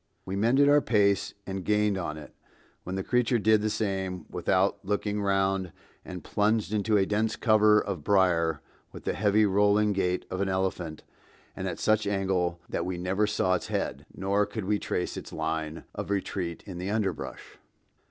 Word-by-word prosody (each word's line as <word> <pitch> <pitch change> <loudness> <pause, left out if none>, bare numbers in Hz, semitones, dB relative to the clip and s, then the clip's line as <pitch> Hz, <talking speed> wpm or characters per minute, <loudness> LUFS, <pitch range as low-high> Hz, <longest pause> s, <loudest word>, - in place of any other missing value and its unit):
We 95 - -4
mended 120 +8 +4
our 145 0 +6
pace 100 -5 +2
and 95 -1 -4
gained 105 0 +2
on 85 -5 -3
it, 75 - -11 0.5
when 90 - -5
the 95 - -2
creature 125 +1 +2
did 110 0 +3
the 110 - 0
same 95 -4 -2
without 95 +2 +1
looking 105 +1 -1
round 95 -2 +1 0.3
and 90 -1 -8
plunged 105 0 0
into 105 0 +2
a 95 - +3
dense 110 +2 0
cover 110 -2 +5
of 95 -8 -4
brier 85 -5 +2 0.3
with - - -10
the - - -1
heavy 105 +1 +3
rolling 105 +1 +3
gait 90 -2 -1
of 95 +1 -2
an 100 - 0
elephant 95 -4 -2 0.5
and 95 - -4
at 85 -3 -3
such 110 -1 +1
an 100 - 0
angle 90 -3 0
that - - -2
we 90 0 -3
never 95 +4 0
saw 95 -3 +1
its 90 - -1
head, - - -3
nor 100 +2 0
could 110 -4 -5
we 105 +1 +1
trace 90 - -3
its - - -8
line 80 0 -3
of - - -5
retreat 95 -3 -3
in 90 -3 -7
the 90 +2 -3
underbrush. 105 -2 -3
100 Hz, 180 wpm, -28 LUFS, 90-105 Hz, 0.5 s, our